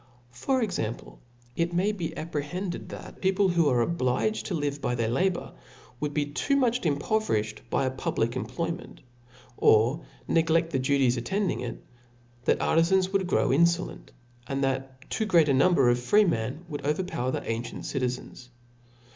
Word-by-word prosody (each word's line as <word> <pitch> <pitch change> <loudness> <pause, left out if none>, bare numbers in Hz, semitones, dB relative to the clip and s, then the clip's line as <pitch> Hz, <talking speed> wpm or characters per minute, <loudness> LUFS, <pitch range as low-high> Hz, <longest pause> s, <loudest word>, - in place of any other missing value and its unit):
JPor 255 - 0
example, 120 - -4 0.4
it 170 +1 0
may 190 +4 +2
be 175 -6 -3
appj^^hedded 165 +4 -4
thltt - - -10
peopibs 190 -1 +2
wh(> - - -5
ar^ 120 -4 +3
obligol 130 - 0
to 185 - -2
live 145 -2 -2
by 125 - 0
their 115 -2 0
labour, 180 +9 0 0.5
would 150 0 -2
be 150 0 0
too.n>VKh.inppo 230 - +1
vcrithed 110 - 0
by - - +1
a 130 - 0
public 120 -2 -1
employment, 170 +6 -4 0.6
or 120 +9 +4 0.3
negloft 165 0 +2
^ 135 -5 -1
duties 130 -2 +2
attending 195 - -1
if; 120 -2 -4 0.7
that - - +3
artifans 185 +3 +3
vould 195 -2 +1
grow; - - +2
in 155 +6 +5
folent; 170 +1 -2 0.4
and 135 +1 -1
that 135 0 -3
too 220 - -1
great 170 -6 +5
apui^jber 140 -1 +4
of 120 - +1
freemen 150 - +1
would 150 -3 -6
overpower 150 -3 -1
the - - -2
anqient 115 +1 -4
citizens. 125 -1 -4
150 Hz, 150 wpm, -27 LUFS, 130-180 Hz, 0.7 s, in